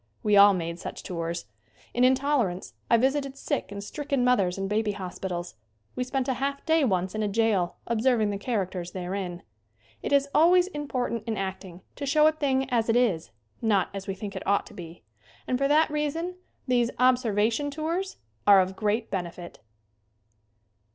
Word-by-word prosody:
We 210 -1 +3
all 200 0 +8
made 170 -1 -4
such - - -7
tours. 170 -1 -4 0.5
In 245 - +2
"In 255 +1 +6
tolerance" 255 -10 -1 0.2
I 235 - +6
visited 270 +2 0
sick 280 -5 -3
and 200 0 -6
stricken 280 +2 -2
mothers 200 -8 +2
in 195 0 -2
baby 210 +1 0
hospitals. 180 - -5 0.4
We 250 - -1
spent 255 0 -2
a 265 - +1
half 280 0 -2
day 320 -1 +3
once 185 -6 0
in 215 - -2
a 210 - +1
jail 205 -4 +1
observing 230 -2 +2
the 200 - -4
characters 190 -6 -3
therein. 180 -1 -4 0.6
It - - -4
is 280 0 +4
always 350 +4 +5
important 255 - -3
in 220 -2 -2
acting 190 -2 -5 0.2
to 280 - -4
show 300 +2 +4
a 310 - +6
thing 270 -4 0
as 230 -2 +1
it 225 - +3
is, 200 - +1 0.3
not 205 -5 +2
as 195 -1 -6
we 195 - -3
think 200 0 -7
it 190 - -6
ought 200 0 +2
to - - -14
be, 165 -5 -10 0.4
and 255 - -1
for 275 - +2
that 305 +2 +3
reason 300 +4 -2 0.3
these 240 -2 +2
"observation 245 0 +2
tours" 330 +6 -3 0.3
are 200 -1 +8
of 190 0 0
great 215 +2 -1
benefit. 175 -2 -5
225 Hz, 180 wpm, -27 LUFS, 190-275 Hz, 0.6 s, all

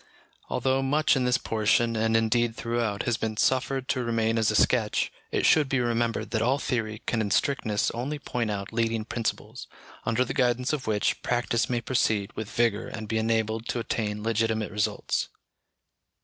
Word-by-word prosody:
Although 130 +2 +1
much 145 +4 +2
in 130 -2 +1
this 125 -1 +3
portion, 115 +1 +1
and 115 0 +2
indeed 115 +1 +1
throughout, 115 -3 -1
has 120 -2 0
been 110 -1 -3
suffered 130 +2 +1
to 130 -2 0
remain 115 -1 +1
as 110 - +2
a - - 0
sketch, - - +2 0.2
it - - +1
should 150 -4 +4
be 135 - +1
remembered 115 -2 -1
that 110 -1 0
all 125 +4 +2
theory 115 -5 -3
can 115 - 0
in 105 - -1
strictness 110 -3 +1
only 130 +6 -3
point 120 -5 -3
out 100 0 -4
leading 115 -1 0
principles, 115 0 -4 0.4
under 115 +3 +1
the - - -4
guidance 125 +1 +1
of 140 -6 -3
which, 105 -2 0
practice 120 -1 0
may 120 -1 0
proceed 110 -5 0
with 110 -2 -5
vigour 115 -3 +1
and 110 -1 -6
be 110 +1 0
enabled 110 0 0
to - - -2
attain 105 -2 -2
legitimate 110 -1 0
results. 105 0 -1
115 Hz, 175 wpm, -27 LUFS, 110-125 Hz, 0.4 s, should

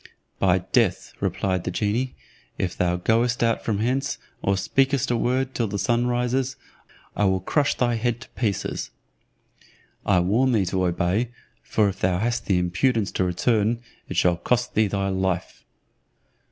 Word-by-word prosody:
"By 95 -2 +4
death," 115 -8 +1
replied 95 -2 -1
the - - -2
genie; 110 +7 -1 0.4
"if 90 -1 -2
thou 90 0 +1
goest 115 +6 +1
out 115 -1 +1
from 110 -3 0
hence, 130 +5 0 0.2
or 100 0 +1
speakest 135 +6 +1
a - - +2
word 130 +3 0
till 115 - 0
the 100 - -3
sun 120 +3 +1
rises, 125 +2 0 0.6
I 105 - +2
will 95 -1 +2
crush 145 - +1
thy 120 -1 +1
head 120 +1 -1
to - - -11
pieces. 105 -6 -2 1.1
I 95 -3 +3
warn 120 +9 +2
thee 105 -4 +2
to 95 0 0
obey, 90 +7 0 0.3
for 105 -2 +1
if 95 - -3
thou 90 -1 +1
hast 115 +4 -1
the 95 - +3
impudence 100 +5 +1
to - - 0
return, 110 +5 +1 0.3
it - - -4
shall 90 -1 +3
cost 125 +7 0
thee 110 0 +3
thy 100 0 -1
life." 95 -1 -2
110 Hz, 165 wpm, -24 LUFS, 95-125 Hz, 1.1 s, By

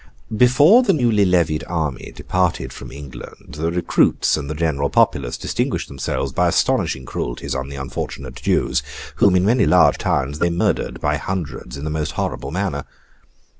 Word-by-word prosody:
Before 145 - +6
the 235 -6 +2
newly 115 - +3
levied 85 -4 +1
army 80 -7 -3
departed 90 -2 -1
from - - -10
England, 70 -1 -11
the 80 +1 0
recruits 90 +1 +2
and 70 - -5
the 75 - -3
general 75 -3 0
populace 65 -3 +1
distinguished - - -2
themselves 70 -1 -3
by - - +2
astonishing 65 0 +1
cruelties - - -4
on 65 0 -4
the 70 - -7
unfortunate 70 -1 -5
Jews: - - +1 0.4
whom, 95 -2 +4
in 90 0 +3
many 115 +4 +3
large - - +5
towns, 70 +2 -1
they 85 - +2
murdered 85 +1 -1
by - - +1
hundreds 80 -8 -5
in 70 - -7
the 75 - -3
most 75 -1 -2
horrible - - -3
manner. 85 -4 -2
80 Hz, 165 wpm, -20 LUFS, 70-95 Hz, 0.4 s, Before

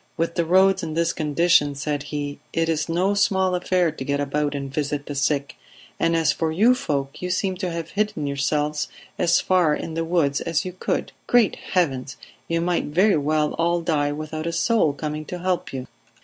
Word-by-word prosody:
"With 165 +1 0
the 170 -1 0
roads 190 +2 +4
in 160 -2 -4
this 165 0 +1
condition," 155 -1 +2
said 145 0 -2
he, 145 -1 -4
"it 165 0 +1
is 160 0 -1
no 180 +4 +1
small 190 -2 +2
affair 180 -1 +1
to 150 - -7
get 140 +1 -1
about 145 +1 -1
and 140 -1 -5
visit 145 -1 -2
the 145 - -5
sick. 140 -1 -1 0.4
And 165 0 +2
as 160 -2 +3
for 160 +3 -1
you 215 +10 +5
folk, 140 - -3
you 180 - -3
seem 185 +1 0
to 185 -1 -2
have 165 -1 -5
hidden 205 -7 -1
yourselves 150 +2 -1 0.3
as 170 -1 +4
far 175 -5 +3
in 165 - -5
the 165 +1 -1
woods 160 -4 +1
as 165 +2 -1
you 180 - -5
could. 185 - -2 0.2
Great 240 -4 +4 0.2
Heavens! 135 -8 0 0.3
You 165 0 0
might 175 0 0
very 185 +5 +3
well 150 +1 +1
all 170 +1 +2
die 150 -3 +1
without 155 +2 -5
a - - 0
soul 220 -7 +2
coming 150 +1 -4
to 180 - -5
help 180 0 -1
you." 130 -1 -5
160 Hz, 200 wpm, -23 LUFS, 145-180 Hz, 0.4 s, you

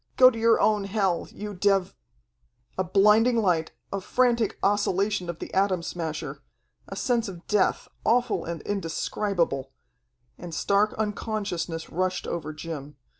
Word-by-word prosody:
"Go 255 0 +9
to 225 - -6
your 230 0 +4
own 210 -2 +2
hell, 195 -4 0
you 210 0 -7
dev 195 -1 +2 0.4
" - - -44 0.3
A - - +3
blinding 210 +6 +4
light, 175 -7 +1 0.2
a 195 - -2
frantic 235 0 +1
oscillation 200 -2 +1
of 170 - -4
the - - -8
Atom 190 -3 +2
Smasher, 160 -3 -4 0.5
a - - -7
sense 240 -3 0
of 180 -3 -9
death, 210 -3 +1 0.2
awful 245 +1 +2
and 165 -2 -5
indescribable 170 -6 -1 0.7
and 170 -2 -7
stark 200 +4 +2
unconsciousness 205 -6 -3
rushed 185 +2 -1
over 155 -2 -4
Jim. 150 -2 -7
195 Hz, 140 wpm, -26 LUFS, 170-215 Hz, 0.7 s, Go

